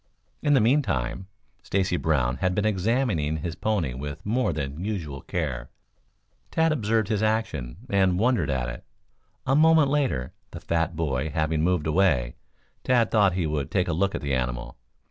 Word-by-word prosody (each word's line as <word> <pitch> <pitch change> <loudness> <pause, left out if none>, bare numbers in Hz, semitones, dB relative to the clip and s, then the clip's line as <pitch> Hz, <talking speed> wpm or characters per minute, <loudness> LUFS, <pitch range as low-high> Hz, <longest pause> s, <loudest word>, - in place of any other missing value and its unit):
In 145 -1 +3
the - - +5
meantime, 95 - 0 0.3
Stacy 95 -2 0
Brown 65 -7 +1
had 90 +6 0
been 105 - 0
examining 100 - 0
his 80 +2 -4
pony 90 -6 -1
with 70 +3 -7
more 120 0 +1
than 75 +1 -4
usual 85 -10 -4
care. 65 0 -3 0.8
Tad 160 0 +2
observed 110 -6 0
his 110 -2 0
action, 110 - -1
and 95 -5 +2
wondered 120 - +2
at 65 -3 -1
it. 65 +1 -7 0.6
A 135 - +2
moment 160 -1 +5
later, 130 - 0 0.2
the - - -8
fat 85 0 -1
boy 75 -2 -1
having 80 +1 0
moved 90 -1 +1
away; 80 -8 +2 0.5
Tad 120 -3 +2
thought 100 -4 +4
he 90 -2 -1
would 75 -3 -2
take 90 -3 0
a 85 - 0
look 100 +4 0
at - - -4
the 70 -1 -2
animal. 60 -1 -2
90 Hz, 165 wpm, -25 LUFS, 70-110 Hz, 0.8 s, the